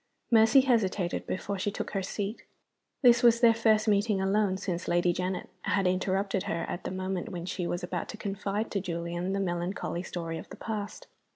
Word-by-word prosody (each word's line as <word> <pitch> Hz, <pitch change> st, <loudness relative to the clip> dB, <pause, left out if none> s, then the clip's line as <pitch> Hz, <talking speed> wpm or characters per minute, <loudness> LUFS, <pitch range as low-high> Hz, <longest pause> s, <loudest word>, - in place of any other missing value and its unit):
Mercy 225 Hz, +3 st, +7 dB
hesitated 205 Hz, -8 st, 0 dB
before 200 Hz, +1 st, -3 dB
she 205 Hz, -, 0 dB
took 200 Hz, -, -5 dB
her 195 Hz, -, -1 dB
seat. 200 Hz, +3 st, -4 dB, 0.6 s
This 240 Hz, -1 st, +7 dB
was 235 Hz, -1 st, +6 dB
their 235 Hz, -1 st, +6 dB
first 220 Hz, -1 st, +3 dB
meeting 205 Hz, 0 st, +2 dB
alone 195 Hz, 0 st, +1 dB
since 185 Hz, -2 st, -3 dB
Lady 175 Hz, 0 st, +2 dB
Janet 185 Hz, +1 st, -3 dB
had 195 Hz, 0 st, +1 dB
interrupted 190 Hz, +1 st, 0 dB
her 165 Hz, -, -2 dB
at 175 Hz, -, -5 dB
the -, -, -1 dB
moment 185 Hz, +2 st, -3 dB
when 175 Hz, -4 st, -5 dB
she 180 Hz, -1 st, -3 dB
was 175 Hz, +1 st, -3 dB
about 175 Hz, -1 st, -3 dB
to 220 Hz, -, -6 dB
confide 205 Hz, +1 st, -3 dB
to 200 Hz, -, -1 dB
Julian 175 Hz, 0 st, -3 dB
the 200 Hz, -, 0 dB
melancholy 175 Hz, -1 st, -2 dB
story 165 Hz, -3 st, -5 dB
of -, -, -11 dB
the -, -, -9 dB
past. 210 Hz, -2 st, -5 dB
195 Hz, 190 wpm, -29 LUFS, 180-215 Hz, 0.6 s, Mercy